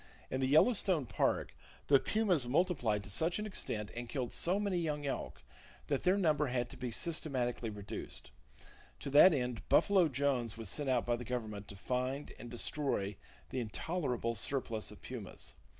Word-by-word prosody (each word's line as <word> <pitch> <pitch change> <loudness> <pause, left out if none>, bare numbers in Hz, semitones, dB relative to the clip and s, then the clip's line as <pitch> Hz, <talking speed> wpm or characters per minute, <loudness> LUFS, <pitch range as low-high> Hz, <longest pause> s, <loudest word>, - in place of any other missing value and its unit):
In 130 - -1
the 130 - +2
Yellowstone 175 - +4
Park - - 0 0.3
the 140 -1 +6
pumas 185 - +1
multiplied 125 - +1
to 100 - -10
such 165 - +2
an 210 - -3
extent 105 - -3
and 120 0 -5
killed 125 -4 -3
so 185 +4 +2
many 200 -4 0
young 150 -3 -2
elk 140 - -4 0.5
that 140 -2 +1
their 185 +2 +3
number 155 -6 +2
had 120 -1 -1
to - - -9
be 125 - -3
systematically 125 -5 -1
reduced. 105 -2 -5 0.7
To 140 - -4
that 150 +7 +9
end 125 -6 -1
"Buffalo" 190 -4 +5
Jones 130 -5 0
was 115 -4 -4
sent 145 +6 -1
out 125 -2 +2
by 120 0 +1
the 120 - -6
Government 110 -4 -4
to 100 - -8
find 130 +7 -2
and 120 - -8
destroy 120 -4 -1 0.4
the 130 - -1
intolerable 125 - -1
surplus 115 -1 -2
of - - -12
pumas. - - -5
130 Hz, 170 wpm, -34 LUFS, 120-160 Hz, 0.7 s, that